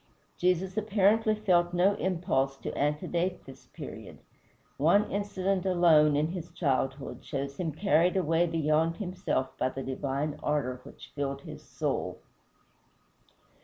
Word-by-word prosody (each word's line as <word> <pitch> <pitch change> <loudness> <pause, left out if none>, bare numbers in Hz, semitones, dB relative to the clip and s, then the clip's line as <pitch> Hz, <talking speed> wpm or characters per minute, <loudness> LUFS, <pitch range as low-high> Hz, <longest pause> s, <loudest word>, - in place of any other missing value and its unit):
Jesus 185 +2 0
apparently 215 +1 +3
felt 175 -4 +2
no 185 +3 +4
impulse 165 -9 0
to - - -6
antedate 170 +5 -1
this 135 - -13
period; - - -9 0.6
one 175 +9 +3
incident 195 -2 -1
alone, 165 -5 +5
in 150 +2 +1
his 175 -1 -6
childhood, 135 -4 -2
shows 140 -1 -4
him 170 -3 -2
carried 175 +2 +2
away 165 -1 +2
beyond 160 0 +1
himself 180 -9 -2
by - - +1
the 135 +1 -6
divine 140 +3 -3
ardor 130 -4 -1
which - - -13
filled 140 -1 -3
his - - -10
soul. - - -3
165 Hz, 130 wpm, -29 LUFS, 145-185 Hz, 0.6 s, alone